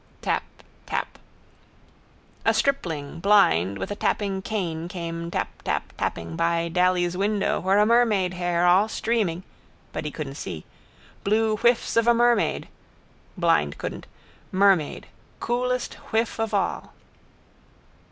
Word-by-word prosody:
Tap. - - +1 0.5
Tap. - - -3 1.2
A - - +3
stripling, 165 - -1
blind, 100 - +4
with - - -5
a - - -2
tapping 200 -2 -1
cane 175 -6 -3
came 170 -1 -5
taptaptapping 85 - -3
by 170 0 +1
Daly's 180 0 +2
window 200 +1 0
where 190 +2 +2
a 210 - +5
mermaid 215 -6 +3
hair 175 -1 0
all 185 +4 +5
streaming 215 -6 -1 0.5
(but - - -3
he 150 - -3
couldn't 145 -2 -6
see) 80 -3 -6 0.6
blew 215 +2 +2
whiffs 240 +3 +2
of 230 0 +3
a 235 - +6
mermaid 240 0 +2 0.7
(blind 165 - +2
couldn't), - - -6 0.4
mermaid, 190 -5 +2 0.3
coolest 250 +1 -1 0.2
whiff 225 +1 0
of 225 -1 -1
all. 200 -2 -1
185 Hz, 120 wpm, -25 LUFS, 170-220 Hz, 1.2 s, a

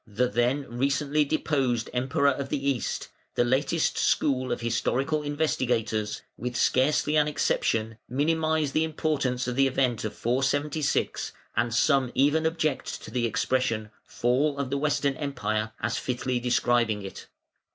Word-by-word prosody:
the 110 +4 +1
then 125 +4 +1
recently 140 +4 +1
deposed 135 -6 0
Emperor 135 +4 +2
of 135 0 -4
the 140 0 -2
East; 125 -5 -3 0.3
the - - +3
latest 135 +6 +1
school 130 -3 +1
of - - -2
historical 130 +6 0
investigators, 125 -8 -1
with 125 0 -4
scarcely 150 +3 +2
an 150 0 +4
exception, 115 -6 0
minimise 155 +2 +1
the 155 - +2
importance 145 -6 -1
of 125 - -2
the 135 +1 +4
event 125 -4 0
of 110 - -4
476, 140 +4 0 0.2
and 120 - +1
some 130 +2 +2
even 145 +4 +3
object 155 -4 -2
to - - -9
the 120 -2 0
expression 115 -3 0
"Fall 140 +5 0
of 140 -2 -3
the 140 - +1
Western 145 -1 +1
Empire" 110 -7 -2
as - - -1
fitly 125 0 -2
describing 120 -3 +1
it. 95 - -9
135 Hz, 140 wpm, -27 LUFS, 120-145 Hz, 0.3 s, an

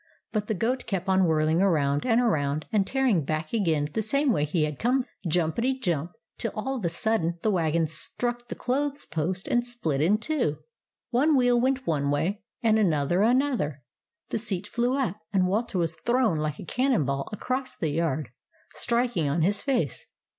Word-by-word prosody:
But 210 -2 -1
the 220 - 0
goat 245 +7 -1
kept 190 -3 -2
on 190 -1 +4
whirling 160 +1 +2
around 145 - +2
and 230 -1 +4
around, 155 -10 +1
and 200 -3 +2
tearing 260 - +2
back 155 +4 -3
again 160 -9 +1
the 220 - 0
same 275 +5 +2
way 145 - +1
he 155 +1 0
had 150 -2 -3
come, 250 +2 +2 0.2
jumpety 180 +11 0
jump, 170 - -1 0.3
till 230 - -2
all 265 +5 -2
of 215 - -4
a - - +2
sudden 175 -2 0
the 215 - +3
wagon 165 -3 +1
struck 240 +10 -2
the - - -5
clothes 285 +3 -1
post 175 +4 -3
and 240 - +2
split 225 - -2
in 190 +7 +4
two. 220 - -1 0.5
One 285 +5 +3
wheel 245 -1 +4
went 260 +1 +1
one 145 -5 0
way, 160 +8 0 0.2
and 220 -1 +4
another 175 -2 +2
another, 230 - +1 0.5
the - - -1
seat 200 -4 -2
flew 240 +4 0
up, 215 -8 -1
and 190 -2 +3
Walter 205 +2 -1
was 170 -2 0
thrown 240 -6 +1
like 150 -1 -2
a - - -8
cannon 250 - +1
ball 140 0 -2
across 255 +5 -3
the 160 - -2
yard, 155 -1 -1 0.4
striking 235 - 0
on 155 +3 +1
his 200 +4 +1
face. 205 - -1
195 Hz, 185 wpm, -26 LUFS, 160-240 Hz, 0.5 s, on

